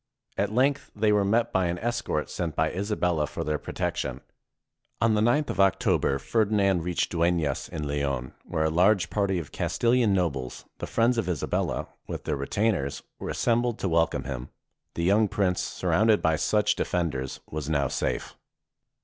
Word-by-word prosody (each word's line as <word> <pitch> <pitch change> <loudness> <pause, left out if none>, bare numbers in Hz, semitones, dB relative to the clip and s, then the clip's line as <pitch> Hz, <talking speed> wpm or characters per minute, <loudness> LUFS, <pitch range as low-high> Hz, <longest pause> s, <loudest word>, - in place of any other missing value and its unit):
At 100 +1 0
length 135 +4 +1
they 105 0 +2
were 105 -1 +3
met 115 +4 +1
by 95 -2 +2
an 85 +1 -2
escort 120 -7 -2
sent 85 -4 -3
by - - +1
Isabella 90 -6 0
for - - -4
their 75 0 -1
protection. - - -3 0.8
On 115 0 +3
the 105 - +2
9th 125 +7 +2
of 95 - -6
October, 95 -7 +3
Ferdinand 100 +5 +2
reached 90 0 -1
Duenas, 85 -2 0
in 75 -2 -4
Leon, 70 -3 -2
where 80 - -2
a 80 - +1
large 95 +3 +3
party 100 -3 +1
of 80 -5 -5
Castilian 120 -2 +2
nobles, 75 -10 -1
the - - -4
friends 115 +1 +2
of 95 -5 -2
Isabella, 85 -6 -1 0.2
with - - -5
their - - -1
retainers, 70 +1 -1 0.2
were - - -5
assembled 120 -1 +1
to 95 - -2
wel 80 0 +4
come 75 -4 -4
him. 65 -1 -5 0.5
The 85 - -2
young 105 +5 +4
prince, 95 -2 0
surrounded 110 +1 +2
by 80 0 +2
such 105 +6 +2
de - - 0
fenders, 70 -7 -2
was 75 -1 -4
now 70 -3 +1
safe. - - -2
90 Hz, 175 wpm, -27 LUFS, 75-110 Hz, 0.8 s, wel